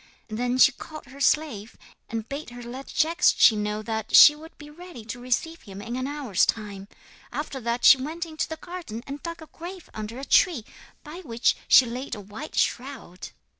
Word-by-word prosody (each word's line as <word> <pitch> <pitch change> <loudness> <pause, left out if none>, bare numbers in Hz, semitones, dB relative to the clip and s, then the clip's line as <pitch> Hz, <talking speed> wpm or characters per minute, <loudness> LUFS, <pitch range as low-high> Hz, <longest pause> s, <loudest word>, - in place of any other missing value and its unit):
Then 245 +3 -1
she 265 - +7
called 310 +3 -10
her 275 +2 -13
slave 265 -9 0 0.3
and 225 -1 -4
bade 280 0 -6
her 245 0 -10
let 255 +3 -8
Jagdschi 310 -7 +4
know 210 0 -3
that 220 -1 -2
she 295 - +10
would 320 +2 -14
be 295 - -12
ready 335 -8 -11
to 240 +2 -7
receive 255 +7 -2
him 195 -2 -11
in 230 +4 -6
an 255 +1 -3
hour's 280 -9 0
time. 200 -3 -2 0.4
After 275 +1 -5
that 235 +1 -1
she 265 - +8
went 325 +5 -4
into 315 -1 -4
the 320 - -4
garden 330 -10 -8
and 280 +1 -7
dug 335 -1 -7
a - - -11
grave 350 +3 -10
under 215 +2 -6
a 270 - -6
tree, 300 - +3 0.4
by 305 +2 -9
which 235 -5 +1
she 260 - +7
laid 245 +3 -5
a - - -9
white 210 +10 -9
shroud. 245 -9 -3
260 Hz, 195 wpm, -25 LUFS, 225-310 Hz, 0.4 s, she